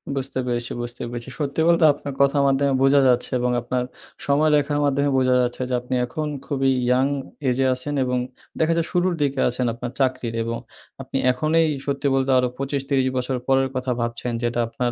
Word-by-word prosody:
বুঝতে 135 Hz, -1 st, -3 dB
পেরেছি, 120 Hz, 0 st, -2 dB
বুঝতে 120 Hz, +1 st, -6 dB
পেরেছি। 120 Hz, +1 st, -6 dB
সত্যি 145 Hz, +2 st, -1 dB
বলতে 170 Hz, -1 st, +4 dB
আপনার 140 Hz, -1 st, -7 dB
কথার 140 Hz, +1 st, +3 dB
মাধ্যমে 135 Hz, 0 st, +2 dB
বুঝা 140 Hz, +1 st, +5 dB
যাচ্ছে 125 Hz, +1 st, +2 dB
এবং 125 Hz, 0 st, 0 dB
আপনার 125 Hz, +1 st, -2 dB, 0.4 s
সময় 150 Hz, +2 st, +3 dB
দেখার 145 Hz, 0 st, 0 dB
মাধ্যমে 140 Hz, 0 st, +1 dB
বোঝা 130 Hz, -1 st, +3 dB
যাচ্ছে 125 Hz, +1 st, -2 dB
যে 125 Hz, -, -2 dB
আপনি 125 Hz, +1 st, -3 dB
এখন 150 Hz, +5 st, -4 dB, 0.2 s
খুবই 135 Hz, -2 st, +1 dB, 0.2 s
ইয়াং 125 Hz, +2 st, +3 dB, 0.4 s
এজে 130 Hz, +2 st, +1 dB
আছেন 135 Hz, +3 st, -3 dB
এবং 125 Hz, 0 st, -1 dB, 0.4 s
দেখা 160 Hz, +1 st, +3 dB
যায় 165 Hz, -, 0 dB
শুরুর 180 Hz, +1 st, +1 dB
দিকে 140 Hz, -1 st, 0 dB
আছেন 125 Hz, +1 st, -2 dB
আপনার 120 Hz, 0 st, -6 dB
চাকরির। 130 Hz, -3 st, 0 dB
এবং 115 Hz, 0 st, -3 dB, 0.4 s
আপনি 135 Hz, +1 st, -4 dB
এখনেই 155 Hz, +5 st, +2 dB, 0.2 s
সত্যি 140 Hz, 0 st, -1 dB
বলতে 135 Hz, 0 st, +1 dB
আরো 125 Hz, -, +3 dB
২৫-৩০ 135 Hz, -1 st, -1 dB
বছর 125 Hz, +1 st, -1 dB
পরের 135 Hz, 0 st, +3 dB
কথা 130 Hz, 0 st, -1 dB
ভাবছেন, 115 Hz, +1 st, -3 dB
যেটা 120 Hz, 0 st, -1 dB
আপনার 120 Hz, +1 st, -2 dB
135 Hz, 185 wpm, -22 LUFS, 125-140 Hz, 0.4 s, বুঝা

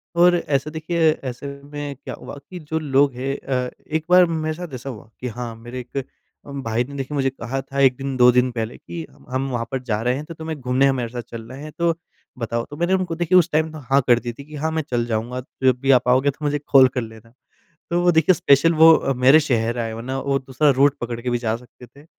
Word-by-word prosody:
और 175 Hz, +1 st, +5 dB
ऐसे 150 Hz, -2 st, -1 dB
देखिए, 160 Hz, 0 st, +1 dB
ऐसे 130 Hz, -1 st, -6 dB, 0.2 s
में 145 Hz, -1 st, -6 dB
क्या -, -, -6 dB
हुआ -, -, -9 dB
कि 180 Hz, -1 st, -7 dB
जो 160 Hz, +1 st, -3 dB
लोग 140 Hz, -2 st, +2 dB
हैं 135 Hz, +3 st, -3 dB
अ, 125 Hz, -2 st, -2 dB, 0.2 s
एक 160 Hz, 0 st, -2 dB
बार 180 Hz, 0 st, +7 dB
मेरे 160 Hz, -2 st, -2 dB
साथ 175 Hz, -5 st, -8 dB
ऐसा 130 Hz, +2 st, -6 dB
हुआ 110 Hz, -3 st, -10 dB
कि 125 Hz, -, -4 dB
हाँ, 120 Hz, 0 st, -6 dB
मेरे 120 Hz, +3 st, -8 dB
एक 125 Hz, +2 st, -5 dB, 0.4 s
उम, 140 Hz, -1 st, -6 dB
भाई 115 Hz, +1 st, 0 dB
ने 140 Hz, +2 st, -10 dB
देखिए 135 Hz, +2 st, -4 dB
मुझे 135 Hz, -1 st, +1 dB
कहा 135 Hz, +1 st, -4 dB
था 140 Hz, +1 st, -6 dB
एक 130 Hz, -2 st, +5 dB
दिन 135 Hz, -1 st, -4 dB
2 125 Hz, 0 st, +7 dB
दिन 125 Hz, +1 st, +3 dB
पहले 115 Hz, -1 st, -4 dB
कि, 165 Hz, -2 st, -7 dB
"हम -, -, -21 dB
हम 130 Hz, +1 st, -2 dB
वहाँ 120 Hz, -2 st, -2 dB
पर 130 Hz, -, -1 dB
जा 110 Hz, -3 st, -1 dB
रहे 125 Hz, +2 st, +1 dB
हैं 145 Hz, +3 st, -5 dB
तो 165 Hz, -, -8 dB
तुम्हें 160 Hz, -2 st, -6 dB
घूमने 130 Hz, +2 st, +2 dB
हमारे 125 Hz, -4 st, 0 dB
साथ 120 Hz, 0 st, -5 dB
चलना 115 Hz, +2 st, -8 dB
है 150 Hz, +2 st, -8 dB
तो 170 Hz, -1 st, +2 dB, 0.4 s
बताओ।" 115 Hz, 0 st, -2 dB
तो 145 Hz, -, -9 dB
मैंने 175 Hz, +3 st, +1 dB
उनको 185 Hz, -3 st, 0 dB
देखिए 175 Hz, +2 st, +3 dB
उस 175 Hz, -1 st, +4 dB
टाइम 155 Hz, +1 st, +1 dB
तो 155 Hz, -, -9 dB
हाँ 140 Hz, -, +5 dB
कर 120 Hz, -1 st, +5 dB
दी 120 Hz, -1 st, -5 dB
थी 140 Hz, -, -11 dB
कि, 155 Hz, 0 st, -11 dB
"हाँ, 160 Hz, +2 st, -2 dB
मैं 160 Hz, 0 st, 0 dB
चल 120 Hz, -1 st, 0 dB
जाऊँगा 120 Hz, +2 st, -2 dB
तो 130 Hz, -, -9 dB
जब 125 Hz, -1 st, +3 dB
भी 135 Hz, 0 st, +3 dB
आप 125 Hz, -, -12 dB
आओगे 130 Hz, +3 st, +4 dB
तो 150 Hz, +2 st, -8 dB
मुझे 145 Hz, 0 st, 0 dB
कॉल 135 Hz, -2 st, +7 dB
कर 125 Hz, 0 st, -3 dB
लेना।" 110 Hz, 0 st, -11 dB, 0.6 s
तो 175 Hz, +1 st, +1 dB
वो 175 Hz, 0 st, +4 dB
देखिए 160 Hz, +3 st, +4 dB
स्पेशल 150 Hz, +3 st, +4 dB
वो 160 Hz, +1 st, +8 dB
अ, 135 Hz, -, 0 dB
मेरे 130 Hz, +5 st, +6 dB
शहर 120 Hz, -5 st, 0 dB
आए 115 Hz, -1 st, -2 dB
वरना 125 Hz, +4 st, -4 dB
वो 140 Hz, 0 st, 0 dB
दूसरा 135 Hz, +2 st, +1 dB
रूट 140 Hz, 0 st, +5 dB
पकड़ 120 Hz, -1 st, -4 dB
के 125 Hz, +1 st, -3 dB
भी 120 Hz, -, +1 dB
जा 115 Hz, -2 st, -1 dB
सकते 125 Hz, 0 st, -15 dB
थे। 140 Hz, +5 st, -19 dB
135 Hz, 260 wpm, -22 LUFS, 125-155 Hz, 0.6 s, वो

